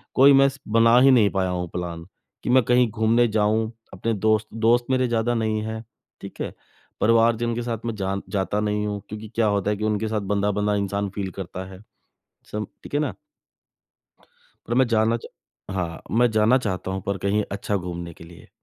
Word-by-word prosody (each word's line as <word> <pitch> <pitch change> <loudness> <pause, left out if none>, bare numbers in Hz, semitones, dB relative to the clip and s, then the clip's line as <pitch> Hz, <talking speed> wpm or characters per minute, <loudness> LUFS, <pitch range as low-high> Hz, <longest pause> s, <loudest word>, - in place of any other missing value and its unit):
कोई 140 +2 +7
मैं 135 0 +6
स 135 - -12
बना 115 +2 +5
ही 135 +1 +6
नहीं 110 -5 +5
पाया 95 -2 0
हूँ 90 -1 -2
प्लान 85 -1 -5 0.4
कि - - -3
मैं 130 0 +5
कहीं 125 +1 +3
घूमने 115 +2 +3
जाऊँ 110 +1 +1 0.2
अपने 115 +5 -2
दोस्त 110 +1 +1
दोस्त 115 +2 +2
मेरे 130 -1 +2
ज़्यादा 115 +1 +1
नहीं 110 -1 0
हैं, 110 +1 -5 0.4
ठीक - - -9
है। - - -4 0.5
परिवार 115 +1 +4
जन 120 0 -1
के 120 - -2
साथ 115 -2 -3
मैं 115 -1 -2
जान 100 -1 -3
जाता 100 +1 -1
नहीं 105 0 -1
हूँ 105 -1 -3
क्योंकि 105 0 -7
क्या 115 -1 +2
होता 100 0 +1
है 105 - -1
कि 105 - -5
उनके 110 0 0
साथ 110 -1 -1
बँधा-बँधा 105 +1 +1
इंसान 100 0 -1
फ़ील 95 -2 -3
करता 95 0 -6
है। 95 +1 -12 0.7
सम 105 0 -3 0.2
ठीक - - -9
है 145 - +2
ना? 150 -3 -2 1.5
पर 120 - -1
मैं 130 0 +4
जाना 115 0 +2
चा 115 - -10 0.5
हाँ, 85 -3 -3
मैं 120 +1 +3
जाना 110 +4 +4
चाहता 95 -6 -3
हूँ 95 0 -3
पर 100 -1 -1
कहीं 105 +1 +1
अच्छा 100 +1 -2
घूमने 85 -2 -6
के 85 - -13
लिए। 85 0 -15
110 Hz, 205 wpm, -24 LUFS, 100-115 Hz, 1.5 s, कोई